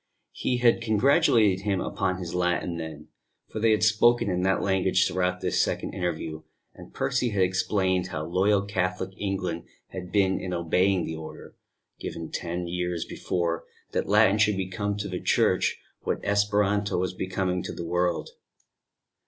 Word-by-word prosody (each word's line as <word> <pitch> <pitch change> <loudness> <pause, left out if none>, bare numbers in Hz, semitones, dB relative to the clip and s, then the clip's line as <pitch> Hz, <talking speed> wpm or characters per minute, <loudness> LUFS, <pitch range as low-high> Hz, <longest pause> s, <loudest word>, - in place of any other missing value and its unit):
He 125 - -1
had 120 -1 +3
congratulated 110 -3 +4
him 100 -1 -1
upon 90 0 -1
his 90 -2 -6
Latin 90 -1 0
then 80 -2 -7 0.4
for - - -5
they 115 +1 +3
had 110 -1 +3
spoken 110 0 +4
in 90 0 0
that 95 +1 +1
language 95 -1 +2
throughout 90 0 -1
this - - +1
second - - -2
interview; 80 -3 -3 0.3
and - - -13
Percy 125 -2 0
had 100 -3 +2
explained 95 0 +1
how 80 -4 -4
loyal 100 +4 +2
Catholic 95 -2 -2
England 95 -4 -3 0.2
had 90 -1 -7
been 95 -2 +2
in 95 -1 -4
obeying 90 +2 +2
the 80 - -4
order, 80 0 -10 0.4
given 80 - -6
ten 85 +1 -3
years 90 -1 -2
before, 85 -2 -2 0.3
that - - -2
Latin 105 0 +5
should 105 -2 +3
become 100 +2 -2
to 100 0 -3
the 90 -2 -4
Church - - +2 0.2
what - - -2
Esperanto 100 0 +1
was 90 +1 -1
becoming 90 0 -2
to - - -5
the 85 - -6
world. 90 0 0
95 Hz, 160 wpm, -26 LUFS, 90-100 Hz, 0.4 s, Latin